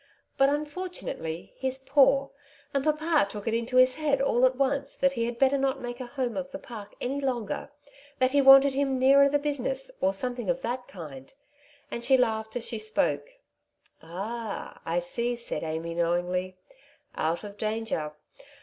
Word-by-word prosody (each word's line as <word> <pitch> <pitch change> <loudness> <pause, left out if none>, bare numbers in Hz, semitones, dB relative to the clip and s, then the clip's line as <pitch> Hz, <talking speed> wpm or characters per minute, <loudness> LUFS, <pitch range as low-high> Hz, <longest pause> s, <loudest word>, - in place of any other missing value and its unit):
But 270 0 +4
unfortunately 295 - -4
he^s 265 0 -3
poor; 275 -1 +4 0.4
and 275 -1 +1
papa 310 -4 +2
took 205 +1 -7
it 225 - +1
into 235 +2 0
his 255 0 +6
head 295 -2 0
all 255 -2 +4
at 255 - -2
once 275 +1 0
that 275 - +2
he 230 -3 -1
had 235 0 -4
better 270 +1 +3
not 270 0 0
make 245 0 -6
a 255 - -5
home 250 -2 -3
of 275 -1 -3
the 285 - -6
Park 220 -7 -10
any 270 +3 -2
longer, 250 -2 -2 0.5
that 255 0 +2
he 285 0 +4
wanted 270 0 +8
him 270 -1 0
nearer 275 +2 +6
the 290 - +3
business, - - -2
or 190 - +3
something 245 +4 -2
of 265 0 0
that 250 +1 -3
kind,^^ 145 -8 -10 0.6
and 235 - -4
she 265 +2 +5
laughed 220 -3 0
as 240 -1 -2
she 225 - -3
spoke. 290 - -1 0.7
"Ah, 200 +6 -6
I 165 +1 0
see," 235 +8 -1
said 235 0 -3
Amy 160 +1 -3
knowingly; 175 +2 -1 0.6
"out 165 +4 -1
of 205 -1 -8
danger. 215 -8 -2
250 Hz, 175 wpm, -27 LUFS, 215-275 Hz, 0.7 s, wanted